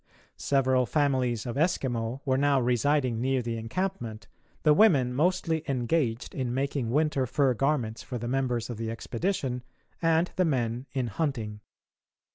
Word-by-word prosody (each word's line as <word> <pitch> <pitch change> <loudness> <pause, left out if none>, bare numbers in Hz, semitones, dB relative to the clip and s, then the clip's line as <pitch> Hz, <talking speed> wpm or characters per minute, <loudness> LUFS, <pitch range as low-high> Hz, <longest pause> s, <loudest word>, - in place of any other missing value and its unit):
Several 130 -2 +2
families 130 -7 +1
of 120 +1 -4
Eskimo 130 -6 0
were 130 -2 +2
now 140 0 +3
residing 125 0 +1
near 130 0 +1
the 115 0 -3
encampment, 115 - -4 0.4
the 150 - +6
women 145 - +4
mostly 165 +1 +1
engaged 125 -2 0
in 125 -2 -2
making 135 -3 -1
winter 140 -1 +1
fur 135 +1 +2
garments 125 -3 0
for 125 - -5
the 120 0 -5
members 125 -2 0
of 120 - -6
the 115 0 -3
expedition, 130 - -2 0.4
and 165 +1 +2
the 185 - +3
men 125 -3 -1
in 130 -2 -1
hunting. 115 -4 -3
130 Hz, 145 wpm, -28 LUFS, 120-150 Hz, 0.4 s, the